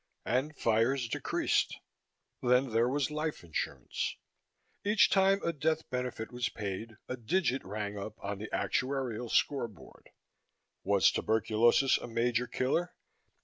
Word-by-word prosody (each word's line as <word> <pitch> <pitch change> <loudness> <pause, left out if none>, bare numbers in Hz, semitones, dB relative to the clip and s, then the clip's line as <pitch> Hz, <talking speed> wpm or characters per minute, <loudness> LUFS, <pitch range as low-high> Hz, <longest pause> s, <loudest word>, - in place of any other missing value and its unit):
And 135 +5 0
fires 115 +3 +2
decreased. - - 0 0.6
Then 125 +1 +3
there 115 +2 +3
was 140 +1 0
life 150 - -3
insurance. 85 -2 -3 0.7
Each 210 +2 +4
time 195 0 +4
a 170 - 0
death 155 +2 0
benefit 125 -3 -3
was 125 0 -1
paid, 105 +1 -5
a 125 - -3
digit 130 +3 0
rang 105 +1 -4
up 105 +2 -6
on 100 0 -4
the 105 - -6
actuarial 125 -3 -1
scoreboard. 120 - -1 0.7
Was 100 0 +4
tuberculosis 115 +4 +3
a - - -7
major 120 +1 0
killer? 140 +10 -1
125 Hz, 125 wpm, -31 LUFS, 110-140 Hz, 0.7 s, Each